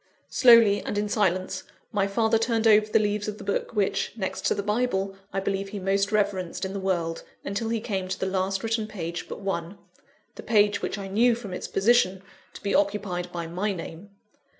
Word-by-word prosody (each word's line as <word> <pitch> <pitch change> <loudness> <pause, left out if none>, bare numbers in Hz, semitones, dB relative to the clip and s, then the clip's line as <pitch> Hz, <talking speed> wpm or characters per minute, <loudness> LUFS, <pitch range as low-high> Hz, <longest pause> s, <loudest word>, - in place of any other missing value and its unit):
Slowly 230 -5 +6
and 205 - -4
in 210 0 0
silence, 185 -3 0 0.3
my 200 -2 +1
father 220 +2 +2
turned 225 0 0
over 215 -1 +6
the 215 - +3
leaves 210 -1 0
of 210 0 -4
the - - -9
book 200 +3 -2
which, 205 -2 0
next 190 -3 -2
to - - +2
the 200 - -2
Bible, 205 -3 0 0.2
I 195 - -1
believe 195 0 -2
he 205 - -6
most 195 +2 +1
reverenced 200 -4 0
in 190 - -4
the 200 - -3
world, 175 -4 -1 0.2
until 200 +3 -2
he 230 0 0
came 195 -4 -3
to 185 0 -4
the - - -1
last 190 0 -1
written 225 -1 -1
page 175 -5 -5
but - - -7
one 195 -1 -3 0.6
the - - -9
page 205 -2 +3
which - - -3
I 195 -1 -5
knew, 230 +5 +3
from 215 -5 -7
its - - -4
position, 195 -3 +2 0.3
to - - -12
be 200 - -1
occupied 195 -3 0
by 170 -1 -4
my 185 +5 -2
name. 170 +2 -8
200 Hz, 205 wpm, -26 LUFS, 190-215 Hz, 0.6 s, Slowly